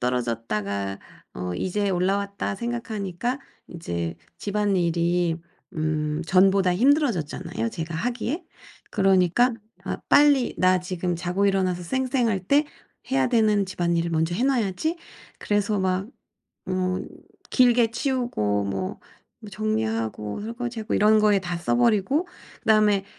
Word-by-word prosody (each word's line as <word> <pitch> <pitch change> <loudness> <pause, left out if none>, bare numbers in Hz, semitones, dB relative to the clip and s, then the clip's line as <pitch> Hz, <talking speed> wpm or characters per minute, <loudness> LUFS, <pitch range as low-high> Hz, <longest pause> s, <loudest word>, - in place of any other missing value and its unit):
떨어졌다가 105 -5 -2 0.4
어 90 0 -4
'이제 200 - -1
올라왔다.' 195 +2 -1
생각하니까 235 0 -3 0.3
이제 85 - -4 0.2
집안일이 175 -4 +1 0.4
음 155 0 -1
전보다 190 0 +4
힘들어졌잖아요, 225 - +1
제가 165 -3 -5
하기에. 245 - -2 0.5
그러니까 195 +5 +3 0.3
'아 - - -2
빨리 285 -3 +5
나 185 0 +4
지금 180 -1 -3
자고 180 +3 0
일어나서 185 -2 +1
쌩쌩할 245 0 0
때 285 +5 +4 0.5
해야 265 0 +3
되는 215 -4 +3
집안일을 170 -2 -1
먼저 165 +1 0
해 230 - -1
놔야지.' 265 - 0 0.4
그래서 205 0 0
막 190 +1 0 0.6
어 185 0 0 0.5
길게 240 -2 +4
치우고 235 - -1
뭐 95 -1 -3 0.5
정리하고 110 - -2
설거지하고 230 0 -4
이런 215 +1 +5
거에 210 -2 +4
다 175 -2 -4
써 170 - 0
버리고 240 - +2 0.3
그다음에 215 -3 +3
190 Hz, 275 characters per minute, -24 LUFS, 170-230 Hz, 0.6 s, 빨리